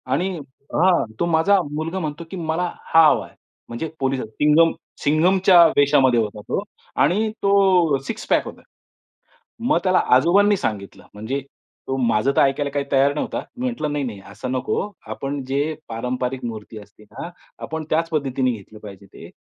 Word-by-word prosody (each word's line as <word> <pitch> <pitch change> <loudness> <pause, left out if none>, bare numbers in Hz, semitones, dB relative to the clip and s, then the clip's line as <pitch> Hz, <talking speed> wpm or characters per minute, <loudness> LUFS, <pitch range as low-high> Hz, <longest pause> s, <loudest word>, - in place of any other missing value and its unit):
आणि 145 +9 0 0.5
हां, 175 -1 +3
तो - - +1
माझा 170 +4 +3
मुलगा 160 +5 -3
म्हणतो, 155 -1 -4
की 190 - -5
"मला 165 +1 -2 0.3
हा 165 0 +8
हवा - - +2
आहे." - - -22 0.3
म्हणजे 120 +8 -4
पोलिस 135 0 0
सिंघम 150 +9 +3 0.3
सिंघमच्या 175 +4 +5
वेशामध्ये 135 -4 +4
होता 105 -1 -3
तो 195 - -1 0.4
आणि 215 +5 +2
तो 190 -6 +4
सिक्स-पॅक 225 - 0
होता. - - -10 1.0
मग 250 +6 +2
त्याला 185 -1 +3 0.2
आजोबांनी 200 +9 +4
सांगितलं 105 - -5
म्हणजे, 110 +7 -3 0.5
तो 135 - -2
माझं 120 0 +1
तर - - +5
ऐकायला 140 +1 +1
काही 140 0 -2
तयार 140 +1 +3
नव्हता. 150 - -3 0.2
मी 245 - -6
म्हंटलं 235 -13 -2
"नाही, 145 -1 -1
नाही 110 -6 -6
असं 125 +5 -6
नको, 130 +10 -2 0.2
आपण 140 0 -4
जे 140 +4 -1
पारंपरिक 125 +2 -3
मूर्ती 110 -1 -7
असते 105 +1 -18
ना, 105 - -8 0.4
आपण 160 0 -5
त्याच 165 +1 +1
पद्धतीने 135 -4 0
घेतलं 110 -1 -11
पाहिजे 100 -2 -12
ते. - - -13
145 Hz, 160 wpm, -21 LUFS, 125-170 Hz, 1.0 s, हा